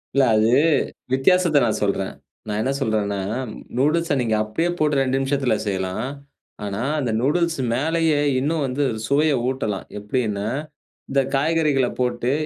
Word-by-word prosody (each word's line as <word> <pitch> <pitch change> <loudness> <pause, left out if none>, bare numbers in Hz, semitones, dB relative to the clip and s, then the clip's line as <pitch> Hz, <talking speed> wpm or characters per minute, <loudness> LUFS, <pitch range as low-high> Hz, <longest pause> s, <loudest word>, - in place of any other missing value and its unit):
இல்ல, 140 - +5
அது 110 +2 +3 0.6
வித்தியாசத்த 155 +2 +4
நான் 110 -2 0
சொல்றேன். 100 -1 0 0.4
நான் 105 0 -2
என்ன 130 - 0
சொல்றேன்னா, 105 -5 0 0.6
நூடுல்ஸ 150 +3 +2
நீங்க 115 -3 +1
அப்டியே 135 +11 -1
போட்டு 150 -1 +2
2 135 0 +1
நிமிஷத்தில 135 -1 +1
செய்யலாம். 95 +3 -2 0.6
ஆனா, 100 +1 -3 0.2
அந்த 130 -6 -1
நூடுல்ஸ் 165 +4 +1
மேலயே 160 +3 +1 0.2
இன்னும் 150 +3 0
வந்து 135 +2 -1 0.2
சுவைய 145 +4 +3
ஊட்டலாம், 130 -7 -2
எப்டின்னா, 105 -1 -2 0.6
இந்த 135 0 +3
காய்கறிகள 150 -2 +2
போட்டு 125 0 0
135 Hz, 130 wpm, -22 LUFS, 110-150 Hz, 0.6 s, இல்ல